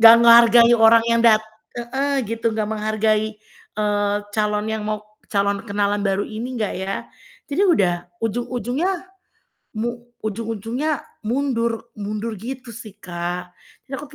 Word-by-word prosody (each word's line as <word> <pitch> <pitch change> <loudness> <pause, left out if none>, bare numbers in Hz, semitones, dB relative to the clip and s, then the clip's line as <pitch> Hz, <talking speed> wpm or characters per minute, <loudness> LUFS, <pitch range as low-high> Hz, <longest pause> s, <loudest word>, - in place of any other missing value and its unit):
gak 230 0 +11
menghargai 235 0 +7
orang 225 0 +7
yang 230 0 +3
dat 220 -2 +7 0.4
heeh, 270 +3 -1
gitu. 230 0 -1
Gak 215 -1 -1
menghargai, 215 0 0 0.3
eee, 205 -1 0 0.2
calon 210 0 0
yang 220 -1 -2
mau 215 0 -2 0.3
calon 200 +1 +1
kenalan 205 -1 0
baru 195 0 0
ini 235 +3 -5
gak 210 - -1
ya. 190 +1 -3 0.5
Jadi 295 +7 0
udah 200 - +3 0.3
ujung-ujungnya 245 - -1 0.9
mu 225 +2 -1 0.4
ujung-ujungnya 230 +7 -2 0.3
mundur 235 -3 -1
mundur 210 +2 -4
gitu 250 +1 -7
sih, 215 -2 -10
Kak. 175 -2 -5 0.3
Jadi 265 - -16
aku 295 - -7
220 Hz, 130 wpm, -21 LUFS, 210-235 Hz, 0.9 s, gak